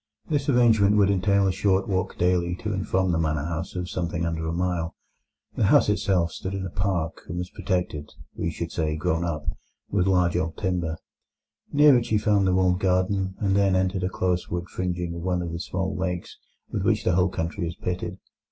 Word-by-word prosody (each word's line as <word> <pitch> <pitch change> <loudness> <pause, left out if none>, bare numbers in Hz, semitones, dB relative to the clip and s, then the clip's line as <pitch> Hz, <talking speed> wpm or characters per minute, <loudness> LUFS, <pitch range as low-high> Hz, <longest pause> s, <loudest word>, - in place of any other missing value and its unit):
This 145 -1 0
arrangement 110 -5 +4
would 100 -1 +4
entail 100 +1 +2
a 95 - +3
short 95 0 +1
walk 95 -1 -1
daily 85 -1 +1
to 105 +3 -4
and 95 -1 -3
from 95 -1 +1
the 80 - +1
manor 75 -2 0
house 85 +2 -4
of 90 -1 -3
something 85 -2 -2
under 80 -1 -2
a - - -1
mile. 85 -1 -1 0.6
The - - +2
house - - +5
itself 90 -4 +1
stood 95 +4 -5
in 95 -1 -3
a 90 - -5
park, 85 -1 -1
and 90 - -5
was 90 0 -4
protected—we 85 -3 -3
should 85 +1 -5
say 80 -2 -1
grown 80 +2 0
up—with 85 +4 -3
large 90 -2 +3
old 80 -2 -1
timber. 90 -4 -1 0.7
Near 145 -3 +6
it 120 0 -5
you 110 - +3
found 105 -2 +2
the 95 - +2
walled 90 -1 +3
garden, 95 0 +1
and 95 -2 +1
then 100 -1 +3
entered 95 0 +1
a 90 - 0
close 90 -1 -1
wood 85 +1 -3
fringing 90 -2 -3
one 90 0 0
of 85 - -4
the 85 - -4
small 95 +1 -3
lakes 90 -1 -3 0.4
with 100 - -1
which 105 +2 +1
the - - +2
whole 90 +2 +3
country 85 0 -3
is 85 - -5
pitted. 90 0 -4
90 Hz, 200 wpm, -25 LUFS, 85-95 Hz, 0.7 s, Near